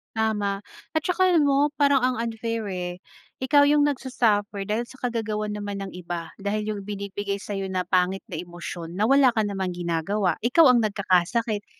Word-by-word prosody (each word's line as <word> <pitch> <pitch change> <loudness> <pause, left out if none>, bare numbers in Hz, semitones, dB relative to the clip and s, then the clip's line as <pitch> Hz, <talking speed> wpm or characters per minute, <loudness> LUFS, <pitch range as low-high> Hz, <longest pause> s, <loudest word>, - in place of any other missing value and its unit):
Tama, 205 -3 0 0.3
at 315 - +1
saka 360 +2 +1
alam 320 - +5
mo, 285 +2 +2
parang 285 -1 +4
ang 255 0 +1
unfair, 230 0 -3
eh. 180 -1 -3 0.5
Ikaw 285 +2 +5
yung 295 - +4
nagsa-suffer 220 -7 0
dahil 215 +4 -1
sa 260 - -15
kagagawan 220 -3 -2
naman 205 -1 -4
ng 195 - -5
iba. 175 -2 -6
Dahil 210 +2 -2
yung 200 -2 -4
binibigay 200 0 -4
sa'yo 195 -2 -4
na 185 -1 -1
pangit 185 +1 +1
na 165 - -5
emosyon 175 -1 -7
na 215 +6 +1
wala 270 -3 +5
ka 220 - +1
namang 195 -3 -2
ginagawa, 175 +3 -1
ikaw 280 +3 +6
ang 245 -1 +5
nagkakasakit. 205 +2 0
210 Hz, 175 wpm, -25 LUFS, 190-235 Hz, 0.5 s, ikaw